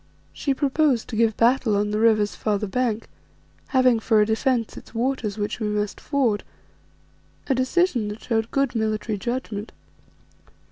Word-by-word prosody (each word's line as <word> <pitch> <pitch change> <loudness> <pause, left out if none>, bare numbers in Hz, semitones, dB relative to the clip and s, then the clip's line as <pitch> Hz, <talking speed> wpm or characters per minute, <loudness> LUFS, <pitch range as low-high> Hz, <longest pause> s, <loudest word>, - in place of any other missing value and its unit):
She 275 -2 -1
proposed 275 -3 +1
to 225 - -4
give 225 -1 +2
battle 235 -2 +3
on 210 +1 0
the 210 - 0
river's 215 -2 +3
farther 210 -1 -1
bank, 230 +1 -1 0.6
having 255 -3 +3
for 220 0 +3
a 210 - +5
defence 230 +1 0
its - - -13
waters 235 -4 -1
which 210 +2 -3
we 215 - -1
must 210 -1 -2
ford, 250 -8 0 1.0
a 270 - +1
decision 260 - +1
that 210 +1 -7
showed 225 -1 0
good 275 -2 0
military 215 -2 -1
judgment. 235 -3 -4
225 Hz, 150 wpm, -24 LUFS, 210-255 Hz, 1.0 s, a